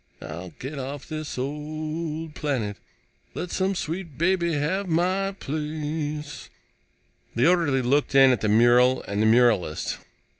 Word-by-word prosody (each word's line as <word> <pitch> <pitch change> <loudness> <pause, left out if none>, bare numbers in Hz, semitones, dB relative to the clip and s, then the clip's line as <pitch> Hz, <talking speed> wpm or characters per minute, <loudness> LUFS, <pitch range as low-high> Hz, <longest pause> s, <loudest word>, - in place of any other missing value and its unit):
I'll 85 +4 -7
get 140 +2 -6
off 135 +1 -6
this 155 -3 -5
old 155 +3 -4
planet, 120 -11 -2 0.6
Let 180 - -4
some 190 +1 0
sweet 165 -3 -4
baby 170 0 +1
have 165 +7 -1
my 185 +4 +1
place. 150 -2 -4 0.9
The 120 +3 +4
orderly 165 -7 +3
looked 140 +3 +1
in 135 -1 +8
at 125 - 0
the 110 - +1
mural 120 +3 +5
and 100 +1 -2
the 110 - +4
muralist. 110 -9 +2
150 Hz, 135 wpm, -25 LUFS, 125-165 Hz, 0.9 s, in